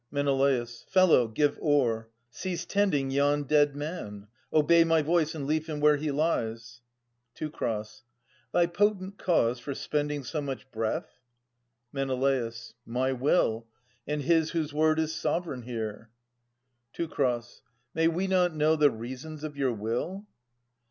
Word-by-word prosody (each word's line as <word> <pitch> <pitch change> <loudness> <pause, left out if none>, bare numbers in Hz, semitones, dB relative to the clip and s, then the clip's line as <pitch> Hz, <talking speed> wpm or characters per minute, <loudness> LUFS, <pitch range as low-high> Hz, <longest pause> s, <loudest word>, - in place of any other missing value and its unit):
Menelaus. 135 -4 0
Fellow, 185 -10 +5
give 145 +6 0
o'er. 120 -7 +1 0.2
Cease 175 +4 -4
tending 170 -9 +1
yon 145 +1 +2
dead 145 0 +3
man! 145 - -6 0.3
'Obey 165 +2 +5
my 165 -1 +3
voice, 160 0 +1
and 145 -3 -4
leave 155 +2 0
him 155 -2 -4
where 150 0 +5
he 150 +1 -2
lies. 115 -6 -2 0.5
Teu. 155 -1 -4 1.0
Thy 175 - +4
potent 195 +2 0
cause 125 -9 +2
for 140 +3 -5
spending 150 -1 -2
so 150 +4 -3
much 135 -1 -6
breath? 110 +1 -3 0.7
Men. 135 -1 -1 0.8
My 125 +3 -1
will, 125 -4 +1 0.4
and 150 0 -2
his 160 +2 +3
whose 160 -3 -2
word 155 +1 +3
is 160 0 0
sovereign 155 -3 -2
here. 115 -2 -5 0.8
Teu. 170 - -3 0.9
May 165 0 +3
we 170 +3 0
not 180 -3 +2
know 155 +1 +3
the 150 -2 +5
reasons 130 +6 -7
of 150 -2 -5
your 135 -2 +1
will 120 - -3
145 Hz, 135 wpm, -28 LUFS, 130-160 Hz, 1.0 s, Fellow